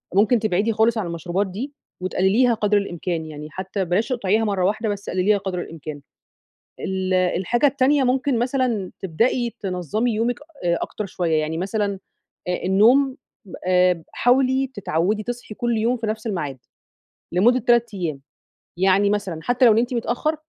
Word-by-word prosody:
ممكن 215 Hz, +4 st, +4 dB
تبعدي 215 Hz, +1 st, +1 dB
خالص 225 Hz, +2 st, +2 dB
عن 200 Hz, -5 st, -2 dB
المشروبات 175 Hz, +4 st, -2 dB
دي 240 Hz, +10 st, -6 dB, 0.3 s
وتقلليها 200 Hz, +7 st, +2 dB
قدر 210 Hz, -1 st, +2 dB
الإمكان، 175 Hz, -4 st, -3 dB
يعني 150 Hz, -1 st, -8 dB
حتى 190 Hz, +2 st, -3 dB
بلاش 180 Hz, +6 st, +1 dB
تقطعيها 225 Hz, -3 st, +1 dB
مرة 195 Hz, -4 st, 0 dB
واحدة، 215 Hz, +2 st, 0 dB
بس 205 Hz, 0 st, -4 dB
قلليها 190 Hz, +3 st, +2 dB
قدر 190 Hz, -3 st, -3 dB
الإمكان. 155 Hz, -3 st, -8 dB, 0.8 s
ال 190 Hz, -1 st, -1 dB
الحاجة 185 Hz, +8 st, +2 dB
التانية 275 Hz, 0 st, +3 dB
ممكن 255 Hz, 0 st, +1 dB
مثلًا 245 Hz, -6 st, 0 dB
تبدئي 230 Hz, +6 st, 0 dB
تنظّمي 195 Hz, -, -1 dB
يومِك 235 Hz, +2 st, 0 dB, 0.3 s
أ 170 Hz, 0 st, +2 dB
أكتر 210 Hz, -, -4 dB
شوية، 165 Hz, -4 st, 0 dB
يعني 160 Hz, +2 st, -3 dB
مثلًا 200 Hz, +1 st, -1 dB, 0.5 s
آآ 180 Hz, -, -1 dB
النوم 245 Hz, +8 st, +4 dB, 0.5 s
آآ 180 Hz, -2 st, +3 dB
حاولي 260 Hz, +2 st, +3 dB
تتعودي 200 Hz, +2 st, 0 dB
تصحي 245 Hz, -1 st, -6 dB
كل 240 Hz, -1 st, -1 dB
يوم 235 Hz, +3 st, +1 dB
في 225 Hz, -1 st, -4 dB
نفس 215 Hz, +1 st, -3 dB
المعاد 150 Hz, -, -3 dB, 0.7 s
لمدة 235 Hz, +9 st, +4 dB
3 235 Hz, -2 st, +2 dB
أيام، 155 Hz, -7 st, -3 dB, 0.6 s
يعني 195 Hz, +2 st, +3 dB
مثلًا 195 Hz, -6 st, -2 dB
حتى 245 Hz, +1 st, +3 dB
لو 225 Hz, -, +7 dB
نمتِ 240 Hz, +3 st, +1 dB
متأخر، 245 Hz, +7 st, -1 dB
205 Hz, 150 wpm, -22 LUFS, 185-240 Hz, 0.8 s, لو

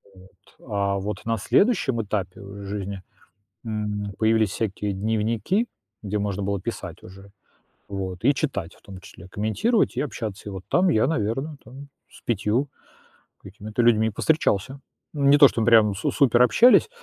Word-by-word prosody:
Вот. 95 Hz, 0 st, -20 dB
А 100 Hz, -1 st, 0 dB
вот 100 Hz, +2 st, -4 dB
на 115 Hz, 0 st, 0 dB
следующем 135 Hz, -, +2 dB
этапе 100 Hz, -1 st, -4 dB, 0.2 s
жизни, 100 Hz, -1 st, -5 dB, 0.6 s
м, 105 Hz, -2 st, -3 dB
появились 110 Hz, -2 st, +2 dB
всякие 105 Hz, 0 st, -3 dB
дневники, 110 Hz, -, 0 dB, 0.4 s
где 105 Hz, 0 st, -2 dB
можно 100 Hz, -1 st, -2 dB
было 100 Hz, 0 st, -2 dB
писать 90 Hz, -5 st, -6 dB
уже, 95 Hz, +2 st, -14 dB, 0.6 s
вот, 95 Hz, -1 st, -5 dB
и 140 Hz, +4 st, +4 dB
читать, 115 Hz, -, -3 dB
в -, -, -24 dB
том 95 Hz, -2 st, -11 dB
числе 95 Hz, -, -13 dB
комментировать 150 Hz, -, 0 dB
и -, -, +1 dB
общаться. 110 Hz, -6 st, -5 dB
И -, -, -7 dB
вот 95 Hz, -1 st, -7 dB
там 185 Hz, +1 st, +3 dB
я, 110 Hz, -5 st, +3 dB
наверное, 135 Hz, +2 st, -2 dB
там 135 Hz, +5 st, -12 dB, 0.2 s
с -, -, -17 dB
5 115 Hz, +4 st, 0 dB, 0.8 s
какими-то 110 Hz, +3 st, -4 dB
людьми 110 Hz, -1 st, +3 dB
повстречался. 135 Hz, -1 st, 0 dB, 0.3 s
Не 140 Hz, -1 st, +4 dB
то 140 Hz, -1 st, +9 dB
чтобы 115 Hz, -3 st, -2 dB
прям 110 Hz, -3 st, +5 dB
су 100 Hz, -, -2 dB
супер 125 Hz, -4 st, +4 dB
общались, 240 Hz, -, +5 dB
110 Hz, 150 wpm, -24 LUFS, 100-125 Hz, 0.8 s, то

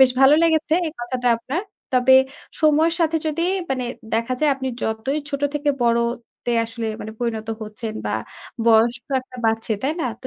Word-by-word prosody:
বেশ 260 Hz, -1 st, +8 dB
ভালো 270 Hz, +2 st, +8 dB
লেগেছে 320 Hz, -1 st, +3 dB
এই 310 Hz, -, -4 dB
কথাটা 245 Hz, 0 st, -1 dB
আপনার। 275 Hz, -, -3 dB, 0.3 s
তবে 255 Hz, +1 st, +5 dB, 0.5 s
সময়ের 315 Hz, +2 st, +4 dB
সাথে 325 Hz, -1 st, +2 dB
যদি 315 Hz, +2 st, -1 dB, 0.3 s
মানে 260 Hz, -2 st, 0 dB, 0.3 s
দেখা 230 Hz, +3 st, 0 dB
যায় 305 Hz, -1 st, +4 dB
আপনি 265 Hz, -1 st, -4 dB
যতই 220 Hz, +7 st, -1 dB
ছোট 280 Hz, 0 st, -3 dB
থেকে 290 Hz, 0 st, +1 dB
বড়তে 235 Hz, 0 st, -1 dB
আসলে 230 Hz, 0 st, -5 dB
মানে 220 Hz, -, -6 dB
পরিণত 225 Hz, -2 st, -3 dB
হচ্ছেন 215 Hz, +1 st, -6 dB
বা, -, -, 0 dB, 0.5 s
বয়স 230 Hz, +1 st, +5 dB
তো 280 Hz, -, -6 dB
একটা 255 Hz, 0 st, -14 dB
বাড়ছে, 225 Hz, 0 st, 0 dB
তাই 280 Hz, +4 st, +1 dB
না? 255 Hz, -, 0 dB, 0.2 s
তো -, -, -5 dB
255 Hz, 175 wpm, -22 LUFS, 230-295 Hz, 0.5 s, বেশ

